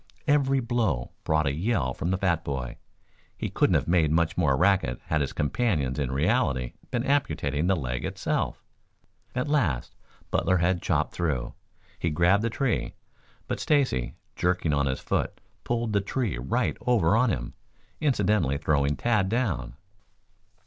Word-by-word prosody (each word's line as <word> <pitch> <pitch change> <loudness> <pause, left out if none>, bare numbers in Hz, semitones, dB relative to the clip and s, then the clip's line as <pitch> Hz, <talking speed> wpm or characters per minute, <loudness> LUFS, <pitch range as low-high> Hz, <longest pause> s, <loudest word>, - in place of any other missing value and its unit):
Every 135 -2 +3
blow 110 - -1
brought 80 0 +1
a 70 - +1
yell 85 - 0
from 85 - -3
the 95 - +1
fat 85 -4 +1
boy. 65 -5 -4 0.6
He - - -3
couldn't - - +2
have - - +1
made 85 -3 +3
much 80 +1 +1
more 75 -7 +2
racket 95 -10 +2
had 80 -1 0
his 70 - -1
companions 75 - 0
in 70 -3 -1
reality 65 -3 +1 0.2
been 120 - -1
amputating 80 - 0
the 95 - +3
leg 65 -6 -3
itself. - - -2 0.7
At 125 +4 -1
last 100 - 0 0.4
Butler 95 - +2
had 85 +1 +1
chopped - - 0
through. 75 -9 -2 0.5
He 85 - 0
grabbed 85 +6 +3
the 115 - +1
tree, 125 +2 -1 0.5
but - - -2
Stacy, 135 - +1 0.2
jerking 90 -3 +1
on 70 -1 +2
his 65 - -2
foot, - - -1 0.2
pulled 120 -2 -1
the 100 - +3
tree 100 - -2
right 65 +2 0
over 115 -7 +3
on 125 +2 +3
him, - - -3 0.5
incidentally 105 - +2
throwing 70 -2 +1
Tad 105 -5 +1
down. 95 - -1
85 Hz, 155 wpm, -27 LUFS, 70-115 Hz, 0.7 s, Every